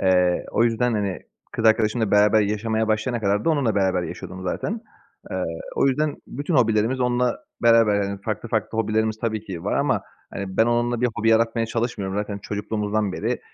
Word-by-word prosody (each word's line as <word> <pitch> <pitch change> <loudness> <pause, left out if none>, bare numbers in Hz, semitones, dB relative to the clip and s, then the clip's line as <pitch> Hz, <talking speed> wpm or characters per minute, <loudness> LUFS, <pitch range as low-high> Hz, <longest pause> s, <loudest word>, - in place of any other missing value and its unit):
Eee, 90 -1 +2
o 115 - +2
yüzden, 120 +1 +1
hani, 100 -4 -2 0.3
kız 115 - -3
arkadaşımla 110 0 +3
beraber 105 +1 +5
yaşamaya 110 +2 0
başlayana 110 +2 0
kadar 100 +1 +1
da - - +3
onunla 140 -8 +1
beraber 95 -2 +1
yaşıyordum 95 +1 -7
zaten. 210 - -3 0.5
Eee, - - -3 0.4
o - - +2
yüzden 145 +2 +1
bütün 145 +5 -3
hobilerimiz 115 +1 +2
onunla 125 0 +1 0.2
beraber 115 -3 +5
yani, 100 0 -4
farklı 110 +1 -4
farklı 110 0 -1
hobilerimiz 110 0 0
tabii 110 -2 -2
ki 90 -5 -7
var - - -1
ama, - - +1 0.3
hani, 95 -1 -6
ben 110 - +4
onunla 120 0 +1
bir 125 - +3
hobi 110 +2 +1
yaratmaya 115 0 +2
çalışmıyorum. 115 -4 -2
Zaten 105 -1 -3
çocukluğumuzdan 105 0 -2
beri, - - -2
110 Hz, 175 wpm, -23 LUFS, 100-120 Hz, 0.5 s, beraber